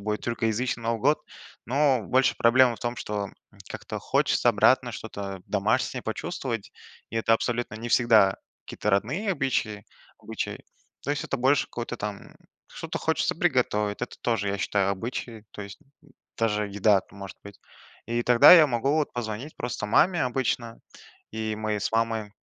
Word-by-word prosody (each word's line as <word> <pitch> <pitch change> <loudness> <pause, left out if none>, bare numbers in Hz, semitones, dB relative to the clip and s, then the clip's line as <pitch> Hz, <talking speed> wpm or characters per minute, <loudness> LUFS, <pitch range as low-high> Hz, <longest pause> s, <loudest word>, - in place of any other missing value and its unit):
будет 105 +1 -2
тюркоязычный 115 +1 -1
Новый 115 -1 -1
год. 145 +5 +3 0.5
Но 135 -1 +2
больше 130 +6 +2
проблема 120 0 +4
в - - -16
том, 120 0 -3
что 105 -3 -4 0.4
как-то - - -6
хочется - - +1
обратно, - - +3
что-то 100 -2 -6
домашнее - - 0
почувствовать. 115 -4 -4 0.4
И - - -4
это 115 0 +2
абсолютно 120 0 -1
не 115 +2 -6
всегда 110 -5 +4 0.3
какие-то 105 - -3
родные 150 - 0
обычаи 120 - -2 0.3
обычаи. - - -5 0.4
То 140 - -4
есть 145 - -2
это - - -2
больше 135 +3 +3
какое-то 120 0 -6
там, 105 -2 -7 0.3
что-то - - -6
хочется - - 0
приготовить, 105 +1 0
это 125 - -5
тоже, 110 -4 0
я 100 0 -2
считаю, 100 +1 +1
обычаи, 115 +2 -5
то 105 - -7
есть, 100 0 -10 0.2
м, 150 - -22 0.3
даже 105 -2 0
еда 100 0 +3
это 95 - -12
может 100 -1 -9
быть. 100 -1 -12 0.5
И 120 +1 -1
тогда 120 +5 +8
я 165 -4 +9
могу 130 +1 0
вот 155 -2 0
позвонить 120 +5 -5
просто 120 -3 -4
маме 170 - +3
обычно. 125 -2 -2 0.5
И 110 -1 -3
мы 110 -1 -2
с 100 - -2
мамой, 115 -2 -1
115 Hz, 160 wpm, -26 LUFS, 105-125 Hz, 0.5 s, я